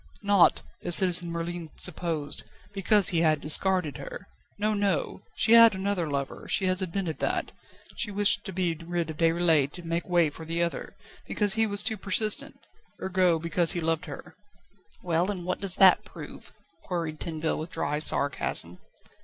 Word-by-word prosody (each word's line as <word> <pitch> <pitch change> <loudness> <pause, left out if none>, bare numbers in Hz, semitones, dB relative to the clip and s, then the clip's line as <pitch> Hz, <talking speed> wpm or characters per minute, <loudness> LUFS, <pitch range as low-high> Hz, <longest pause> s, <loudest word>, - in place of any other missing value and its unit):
Not, 200 -3 +3 0.2
as 175 - +5
Citizen 180 -2 +5
Merlin 170 0 -5
supposed, 160 -4 -4 0.3
because 200 0 +6
he 165 -2 0
had 155 -2 +2
discarded 155 -2 0
her. - - -9 0.3
No, 215 +1 -1
no; 200 -4 -2
she - - +1
had 230 -3 +7
another 190 -4 -2
lover 140 -1 -5
she 190 - +1
has 185 +1 0
admitted 180 -2 -4
that. - - -2 0.5
She 225 - -2
wished 205 0 +1
to 195 - -5
be 180 -2 -1
rid 165 0 -4
of 155 - -11
Déroulède 165 -4 +1
to 175 - -10
make 170 +2 -4
way 170 -4 +2
for 160 - -11
the 165 +1 -2
other, 170 - -5 0.3
because 205 -2 0
he 225 0 +1
was 205 0 +3
too 220 0 -2
persistent 205 +2 -2 0.4
ergo, 185 -2 +1
because 170 +1 0
he 175 - -3
loved 165 -1 -2
her." 145 - -10 0.7
"Well, 175 +1 0
and 185 -4 -5
what 185 - -3
does 195 -2 +3
that 190 -2 +5
prove?" - - -12 0.3
queried 165 -4 -4
Tinville 160 -1 -3
with 160 +2 -6
dry 150 -1 -3
sarcasm. 130 - 0
175 Hz, 170 wpm, -26 LUFS, 160-190 Hz, 0.7 s, had